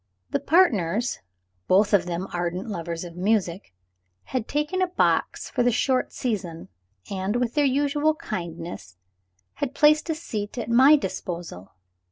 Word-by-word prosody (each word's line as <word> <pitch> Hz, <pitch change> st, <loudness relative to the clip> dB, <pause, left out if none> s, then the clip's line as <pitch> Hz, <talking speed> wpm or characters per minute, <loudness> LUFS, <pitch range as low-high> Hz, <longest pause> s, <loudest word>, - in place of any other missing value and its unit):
The -, -, +1 dB
partners 235 Hz, -, +2 dB, 0.5 s
(both 200 Hz, +3 st, +4 dB
of 185 Hz, -3 st, +4 dB
them 175 Hz, +2 st, -3 dB
ardent 175 Hz, +3 st, -2 dB
lovers 170 Hz, -4 st, -4 dB
of 170 Hz, -1 st, -9 dB
music) 190 Hz, -, 0 dB, 0.5 s
had 255 Hz, -4 st, -3 dB
taken 300 Hz, +6 st, -1 dB
a 370 Hz, -, +3 dB
box 360 Hz, -, 0 dB
for -, -, -1 dB
the 245 Hz, -, +4 dB
short 255 Hz, +2 st, +1 dB
season, 185 Hz, -9 st, -4 dB, 0.4 s
and, 195 Hz, +2 st, -2 dB
with 245 Hz, -1 st, 0 dB
their 295 Hz, -1 st, +2 dB
usual 290 Hz, +3 st, +2 dB
kindness, 170 Hz, -, -6 dB, 0.6 s
had 280 Hz, -1 st, -2 dB
placed 305 Hz, +2 st, +4 dB
a 320 Hz, -, +1 dB
seat 215 Hz, -9 st, -5 dB
at 235 Hz, -1 st, -3 dB
my 265 Hz, +6 st, +7 dB
disposal. 170 Hz, -, -5 dB
215 Hz, 145 wpm, -25 LUFS, 175-280 Hz, 0.6 s, my